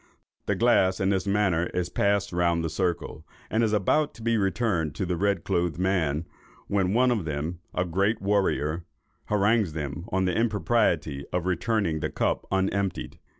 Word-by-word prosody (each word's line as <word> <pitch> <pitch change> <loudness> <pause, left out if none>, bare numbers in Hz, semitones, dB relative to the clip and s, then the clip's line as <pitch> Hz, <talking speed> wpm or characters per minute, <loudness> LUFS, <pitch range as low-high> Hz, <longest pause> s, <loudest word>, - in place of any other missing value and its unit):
The - - +1
glass 95 0 +3
in 95 - +1
this 95 0 0
manner 95 -4 +2
is 90 -1 -1
passed 100 -2 +1
round 85 -1 +1
the 80 - -2
circle, 85 -3 -2 0.3
and 115 +1 +2
is 110 - +2
about 145 +9 +1
to 115 - -11
be 115 0 +2
returned 95 - 0
to 95 - -2
the 90 0 -1
red 100 0 0
clothed 85 -2 0
man, 85 -5 0 0.4
when 100 0 0
one 125 +1 +4
of 110 -6 0
them, 80 +3 -3
a 90 - -1
great 100 +6 +1
warrior, 95 -5 0 0.4
harangues 105 -3 +2
them 75 +1 -4
on 95 0 +1
the 90 -2 0
impropriety 100 -9 +1
of 90 -1 -1
returning 95 -4 0
the 80 -1 -2
cup - - -1
unemptied. 95 0 -1
95 Hz, 170 wpm, -26 LUFS, 85-105 Hz, 0.4 s, one